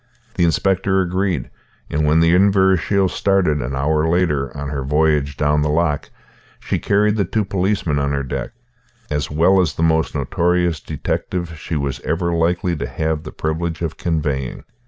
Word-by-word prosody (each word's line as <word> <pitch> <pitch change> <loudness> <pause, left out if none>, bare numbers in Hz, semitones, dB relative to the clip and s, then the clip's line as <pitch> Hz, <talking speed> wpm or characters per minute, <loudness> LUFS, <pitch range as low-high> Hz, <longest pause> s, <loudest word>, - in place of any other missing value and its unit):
The 85 - +2
inspector 95 +3 +1
agreed; 90 -5 -1 0.4
and 75 +1 0
when 80 +2 +4
the 85 +1 +4
Inverashiel 95 0 +3
started, 90 -6 +1
an 65 +3 -3
hour 75 +3 +1
later, 80 -6 +1
on 70 0 -4
her 70 -2 -3
voyage 75 -1 +1
down 75 0 +2
the 75 - 0
loch, 75 -1 0 0.5
she - - -2
carried 105 +1 +2
the 100 - +2
two 105 +3 -1
policemen 95 -5 0
on 70 0 0
her 70 -1 -1
deck, 65 - -4 0.6
as 75 -1 -1
well 85 +5 +4
as 85 - -1
the 80 - -1
most 80 -1 +1
notorious 85 -1 +1
detective 85 +5 -3
she 80 +2 -5
was 70 -2 -2
ever 85 +1 -1
likely 85 +1 +1
to - - -3
have 80 -1 -2
the 75 - -9
privilege 80 +2 -3
of 80 -2 -3
conveying. 75 -6 -2
80 Hz, 170 wpm, -20 LUFS, 75-90 Hz, 0.6 s, when